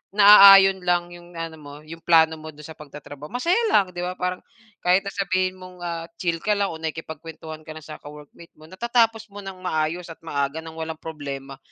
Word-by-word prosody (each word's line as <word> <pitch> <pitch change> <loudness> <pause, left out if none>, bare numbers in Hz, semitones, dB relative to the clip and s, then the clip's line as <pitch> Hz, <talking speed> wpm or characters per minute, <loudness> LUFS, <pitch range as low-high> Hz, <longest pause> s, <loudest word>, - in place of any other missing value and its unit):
naaayon 195 -2 +9
lang 175 -1 0
'yong 175 0 -14
ano 165 -1 -6
mo, 145 -1 -12
'yong 165 +2 -10
plano 160 -1 +4
mo 155 0 -9
do'n 150 - -13
sa 160 - -10
pagtatrabaho, 145 0 -11
masaya 340 - +1
lang. 190 -3 +3
'Di 175 - -8
ba 180 +1 -4
parang 180 0 -3 0.4
kahit 180 +2 +3
sasabihin 185 -1 -1
mong 185 -1 -13 0.4
chill 170 -2 -1
ka 210 - +1
lang 200 -2 -1
o 160 - -8
nakikipagkuwentuhan 160 0 -7
ka - - -7
lang 155 - -10
sa 155 - -10
ka-workmate 150 +3 -14
mo, 155 - -18
natatapos 225 +3 0
mo 205 - -10
ng 190 -1 -9
maayos 170 0 -2
at 165 - -12
maaga 140 0 -2
nang 160 0 -11
walang 160 0 -4
problema 140 -3 -7
165 Hz, 195 wpm, -23 LUFS, 155-185 Hz, 0.4 s, naaayon